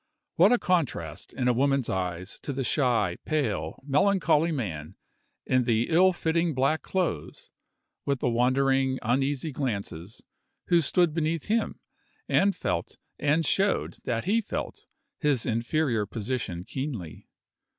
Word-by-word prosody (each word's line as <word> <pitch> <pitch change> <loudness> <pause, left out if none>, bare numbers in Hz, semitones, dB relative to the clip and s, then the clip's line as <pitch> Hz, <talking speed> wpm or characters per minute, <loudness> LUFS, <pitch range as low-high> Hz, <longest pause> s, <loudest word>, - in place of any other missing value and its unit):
What 185 +5 +6
a 245 - +5
contrast, 130 - -1
in 125 -2 -2
a 125 - +4
woman's 135 0 +1
eyes, 90 0 -3
to - - -5
the 135 0 -2
shy, 120 - +1
pale, 145 -9 -1
melancholy 165 +1 +3
man, 85 - -4 0.5
in 130 -1 +2
the 115 -1 +1
ill 185 +3 +6
fitting 165 -2 0
black 135 +5 +2
clothes, 175 - -3 0.5
with 140 -2 -1
the - - 0
wandering, 130 +2 +2
uneasy 135 +5 0
glances, 105 - -4 0.5
who 170 -1 +5
stood 170 +1 +2
beneath 160 -1 -1
him, 225 +1 0 0.5
and 200 +1 +3
felt, - - -3 0.2
and 150 +3 +2
showed 195 +6 +1
that 115 -2 -1
he 225 +4 +2
felt, - - -5 0.3
his 145 -7 +1
inferior 115 -1 0
position 110 -5 -4
keenly! 120 - -6
135 Hz, 130 wpm, -27 LUFS, 115-160 Hz, 0.5 s, What